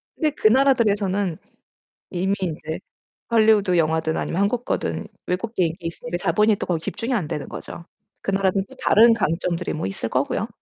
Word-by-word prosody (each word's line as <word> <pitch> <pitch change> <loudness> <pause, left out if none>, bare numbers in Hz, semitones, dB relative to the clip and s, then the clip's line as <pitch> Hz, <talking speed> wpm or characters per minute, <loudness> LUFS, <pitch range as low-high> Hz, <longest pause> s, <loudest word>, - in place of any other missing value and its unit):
근데 310 -3 +1
그 280 - +2
나라들에서는 205 - +2 0.7
이미 190 +2 0
인제 160 -2 -3 0.5
할리우드 215 -5 +4
영화든 160 0 +1
아니면 180 - -2
한국 235 +4 0
거든 - - -2 0.2
외국 215 +6 -2
게 185 - +2
인기 165 +1 -6
있으니까 165 0 -4
자본이 210 +5 +3
또 - - -4
거기에 175 -3 0
집중이 235 +8 -3
안 195 -9 0
되는 150 -1 -4
거죠. 170 - -8 0.4
그 - - -2
나라도 195 0 +1
또 - - -15
다른 230 +2 +6
강점들이 170 -2 -1
뭐 155 - -3
있을 95 +3 -3
거고요. 200 - 0
190 Hz, 385 characters per minute, -23 LUFS, 165-220 Hz, 0.7 s, 다른